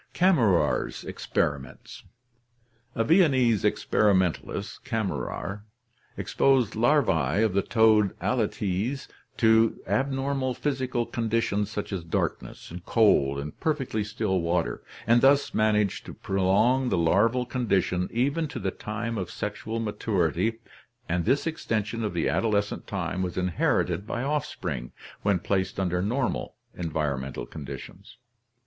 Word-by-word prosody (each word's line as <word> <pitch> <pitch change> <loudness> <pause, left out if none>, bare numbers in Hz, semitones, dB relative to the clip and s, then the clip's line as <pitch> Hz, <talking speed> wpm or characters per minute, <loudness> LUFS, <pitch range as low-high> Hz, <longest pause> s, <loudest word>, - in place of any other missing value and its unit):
Kammerer's 125 - +2
Experiments. 70 -3 -3 0.5
— 120 0 -40
A 115 - +1
Viennese 130 - +4
experimentalist, 95 0 +1
Kam 115 -6 -1
merer, 95 +8 -4 0.6
exposed 130 -5 +2
larvae 110 - +2
of 110 -4 +1
the 100 - +3
toad 110 -1 +3
Alytes 110 +1 -1 0.3
to 110 -1 +4
abnormal 135 -1 -1
physical 130 -4 -1
con 115 -1 -3
ditions 105 -2 +1
such 105 -1 -5
as 90 -3 -3
darkness, 80 0 -3
cold, 70 - +3
and 75 +1 -6
perfectly 135 -9 -1
still 105 -3 -1
water, 85 0 -1 0.2
and 120 +1 +4
thus 140 +1 +4
managed 105 -2 +1
to - - -8
prolong 100 +7 +2
the - - +1
larval 105 +9 +3
condition 100 -7 0
even 140 +7 0
to - - -7
the 95 - -2
time 110 +2 -4
of 90 -2 -4
sexual 110 +2 -4
maturity, 105 0 -1 0.5
and 85 0 -1
this 135 +5 +2
extension 115 -8 -2
of 105 -4 -3
the 85 - +1
adolescent 100 +6 0
time 95 -2 -3
was 90 -1 -3
inherited 90 +2 0
by 120 - -3
offspring 100 - -3 0.3
when 100 -2 +2
placed 95 +2 -1
under 90 -2 0
normal 125 +6 -1 0.2
environmental 75 -7 -3
conditions. 70 -1 -9
105 Hz, 125 wpm, -26 LUFS, 90-120 Hz, 0.6 s, Viennese